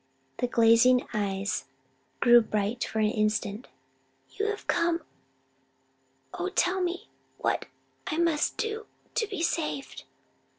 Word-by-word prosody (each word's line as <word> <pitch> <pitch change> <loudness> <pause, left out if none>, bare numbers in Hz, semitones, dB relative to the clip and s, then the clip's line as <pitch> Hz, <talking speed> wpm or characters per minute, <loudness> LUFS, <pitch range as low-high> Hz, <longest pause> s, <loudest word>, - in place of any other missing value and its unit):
The 245 - 0
glazing 235 +2 +5
eyes 200 -4 -1 0.6
grew 240 0 +8
bright 215 +2 -1
for - - -4
an 215 -1 +3
instant. 215 +1 -1 0.6
"You 420 - -2
have 420 -1 -3
come: 335 -1 +1 1.3
oh 370 - -2
tell 375 0 +1
me 360 0 -3 0.3
what - - -1 0.4
I 310 - -2
must 330 -3 +1
do 445 0 -3 0.3
to 465 -3 0
be 395 -6 -3
saved!" 305 -5 -2
260 Hz, 120 wpm, -28 LUFS, 220-360 Hz, 1.3 s, grew